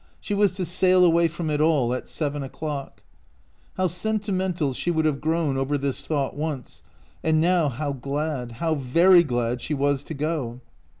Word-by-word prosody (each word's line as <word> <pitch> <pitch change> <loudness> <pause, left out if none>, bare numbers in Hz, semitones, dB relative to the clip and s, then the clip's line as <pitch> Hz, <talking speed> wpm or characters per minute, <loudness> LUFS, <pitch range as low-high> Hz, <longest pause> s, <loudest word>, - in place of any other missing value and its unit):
She 205 - -4
was 200 -2 +3
to 185 -1 -2
sail 185 +1 +4
away 170 0 +4
from 160 0 -4
it 150 0 0
all 145 -6 +2
at 125 - -4
seven 145 -2 -2
o'clock. 140 +1 -6 0.7
How 185 - +1
senti 205 +4 0
mental 180 -7 -1
she 175 - -3
would 160 -2 +1
have 150 -3 0
grown 160 -3 0
over 135 +2 0
this 140 -1 -3
thought 140 -4 -1
once, 145 -4 -5 0.4
and 160 -1 +2
now 170 -2 +3
how 140 +3 -3
glad, 140 -2 -3
how 160 +7 -1
very 165 +7 +5
glad, 120 -5 -1
she 150 - -2
was 140 0 0
to 160 - -6
go. 140 -5 -3
155 Hz, 180 wpm, -24 LUFS, 140-170 Hz, 0.7 s, very